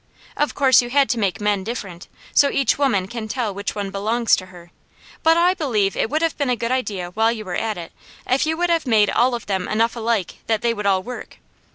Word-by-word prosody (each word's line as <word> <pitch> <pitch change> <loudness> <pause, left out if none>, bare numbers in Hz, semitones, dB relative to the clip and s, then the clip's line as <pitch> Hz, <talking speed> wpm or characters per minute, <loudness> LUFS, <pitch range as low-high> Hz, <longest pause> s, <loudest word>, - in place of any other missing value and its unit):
Of 295 - -1
course 265 -4 +5
You 240 - -6
had 275 +1 +3
to 240 - 0
make 200 0 0
men 205 -2 0
different, 195 -6 -6 0.3
so 285 - +5
each 275 -4 +1
woman 205 -10 +1
can 225 +1 -6
tell 225 -2 -2
which 200 +1 -4
one 200 -2 -4
belongs 220 +4 +2
to 185 - -7
her; 175 -2 -15 0.5
but 325 +1 +4
I 350 +2 +4
believe 225 - 0
it - - 0
would 310 +3 0
have 330 - 0
been 285 -3 0
a 250 - +2
good 235 +1 -3
idea 200 -9 -2
while 225 +4 +2
You 220 -2 -6
were 180 - -5
at 220 0 -2
it, 170 -1 -8 0.3
if 265 +4 +1
You 320 0 0
would 350 0 +1
have 330 -4 +1
made 215 -3 +4
all 245 +1 +2
of 235 - -7
them 190 -2 -2
enough 230 +2 +1
alike 225 -5 -1
that 220 -2 0
they 235 -1 +2
would 210 -2 -3
all 190 -1 +2
work. 250 +3 -8
225 Hz, 245 wpm, -21 LUFS, 200-260 Hz, 0.5 s, course